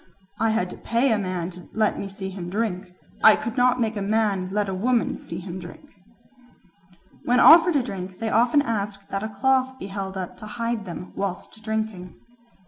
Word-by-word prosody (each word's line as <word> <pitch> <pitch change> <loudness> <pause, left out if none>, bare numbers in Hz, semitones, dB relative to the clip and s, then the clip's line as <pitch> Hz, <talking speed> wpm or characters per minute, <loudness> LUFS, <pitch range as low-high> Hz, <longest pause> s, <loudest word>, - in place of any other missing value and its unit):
"I 225 +1 +2
had 200 -5 0
to - - -9
pay 235 +3 +1
a 220 - +2
man 185 -2 -3
to 180 0 -12
let 215 -1 +1
me 195 - -4
see 190 -1 -6
him 180 -2 -6
drink; 195 -2 -2 0.4
I 220 - +9
could 230 - -5
not 250 -1 +3
make 225 -2 0
a 205 - -3
man 200 -2 0
let 205 0 0
a 190 - -2
woman 235 +5 +1
see 165 - -7
him 180 0 -6
drink." 175 - -11 1.4
When 245 +1 +3
offered 335 +1 +8
a 275 - +3
drink 190 -5 -6
they 225 -1 -2
often 240 +6 +4
ask 200 -4 -3
that 195 - -2
a 220 - -3
cloth 260 +4 +1
may - - -22
be 195 - -5
held 195 -1 -5
up 185 -2 -5
to 215 - -9
hide 230 -2 -2
them 180 0 -8
whilst 200 +2 -5
drinking. 220 -4 -3
210 Hz, 205 wpm, -24 LUFS, 190-230 Hz, 1.4 s, I